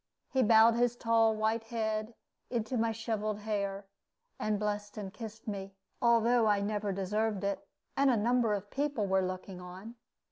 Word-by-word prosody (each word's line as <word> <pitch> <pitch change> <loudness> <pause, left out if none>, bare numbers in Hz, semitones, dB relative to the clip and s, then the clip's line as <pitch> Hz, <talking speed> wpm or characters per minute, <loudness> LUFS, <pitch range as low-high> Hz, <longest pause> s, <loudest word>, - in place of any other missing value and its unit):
He 260 - +2
bowed 225 0 +7
his 240 0 +2
tall 225 -2 +3
white 220 +1 0
head 220 -1 -2 0.3
into 235 0 -2
my 230 -1 +2
sheveled 215 -2 -2
hair, 200 -2 -2 0.5
and 215 -1 0
blessed 205 0 -3
and 195 -2 -5
kissed 220 -1 -9
me, 195 -2 -5 0.3
although 235 0 +4
I 205 -1 +3
never 205 0 -1
deserved 200 +2 -1
it, 200 0 -2 0.3
and 275 0 +4
a 245 - +3
number 230 0 +2
of 205 0 -7
people 280 -6 -1
were 190 0 +2
looking 185 0 -5
on. 185 +5 -9
215 Hz, 165 wpm, -31 LUFS, 200-230 Hz, 0.5 s, bowed